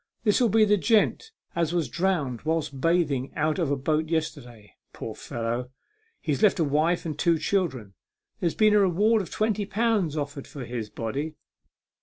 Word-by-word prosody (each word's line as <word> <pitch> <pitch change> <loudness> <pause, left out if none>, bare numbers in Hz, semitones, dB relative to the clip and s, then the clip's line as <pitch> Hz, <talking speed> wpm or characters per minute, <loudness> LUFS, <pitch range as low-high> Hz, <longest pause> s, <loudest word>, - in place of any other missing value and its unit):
This'll 230 +2 +3
be 220 +1 +5
the 210 0 +3
gent 225 - +2 0.3
as 170 -1 0
was 170 -4 0
drowned 170 -10 -1
whilst 155 -4 -2
bathing 150 -6 +1
out 155 +2 0
of 165 -5 +1
a 145 - +2
boat 155 +3 -1
yesterday. 125 -9 -4 0.2
Poor - - -6
fellow! 120 +2 -4 0.5
he's 150 -4 -2
left 210 - +4
a 170 - +2
wife 155 +5 +1
and 155 -3 -3
two 170 -1 +3
children. 140 - -1 0.5
There's 170 -2 0
been 215 -1 +4
a 210 - +6
reward 205 +4 +3
of 185 - -7
twenty 215 -2 -1
pounds 205 -7 +1
offered 145 -1 -4
for 135 -4 -8
his 115 -3 -5
body. 135 +9 -4
160 Hz, 170 wpm, -26 LUFS, 140-195 Hz, 0.5 s, a